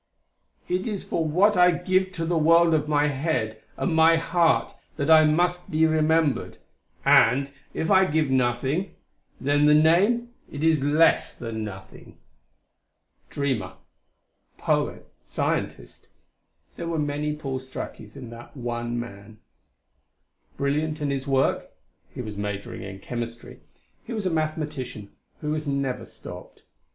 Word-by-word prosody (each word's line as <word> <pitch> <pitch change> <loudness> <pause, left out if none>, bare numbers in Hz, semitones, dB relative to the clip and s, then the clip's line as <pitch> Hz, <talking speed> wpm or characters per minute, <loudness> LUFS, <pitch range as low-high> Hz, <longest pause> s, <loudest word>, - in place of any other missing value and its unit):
"It 185 +4 -1
is 205 -4 -3
for 165 - -1
what 185 +7 +3
I 180 0 +6
give 185 +2 +1
to 165 -2 -3
the 170 +1 0
world 165 +1 +5
of 150 -1 +1
my 150 0 +3
head 130 -7 -2 0.2
and 175 - -1
my 160 +1 +6
heart 165 0 +2 0.2
that 140 +3 0
I 155 -1 +8
must 175 +3 +1
be 160 0 +3
remembered. 160 -1 +1 0.5
And, 135 +4 +5 0.2
if 160 - -1
I 190 0 +6
give 155 -4 0
nothing 130 +8 0 0.4
then 145 +2 +2
the 150 - +6
name, 195 +10 +3 0.2
it 145 +1 -5
is 160 -4 +3
less 150 +3 +3
than 115 -2 -5
nothing." 95 -2 -10 1.1
Dreamer 115 -10 -2 0.8
poet - - -1 0.2
scientist - - -3 0.7
there 170 - -5
were 165 -1 -2
many 150 0 -1
Paul 135 -3 -4
Strakis 130 +2 -8
in 125 -4 -9
that 120 +4 -12
one 120 -1 -3
man. 105 -2 -9 1.2
Brilliant 150 +3 -1
in 145 -2 -1
his 135 0 -3
work 135 -1 +1 0.4
he - - -7
was 105 -3 -7
majoring 100 -1 -5
in 95 -1 -7
chemistry 120 0 -6 0.4
he 235 - -7
was 215 -3 -3
a 185 - +1
mathematician 155 -9 -3 0.3
who 150 - -2
was 155 -1 -3
never 140 -2 -2
stopped. - - -12
150 Hz, 140 wpm, -25 LUFS, 130-165 Hz, 1.2 s, I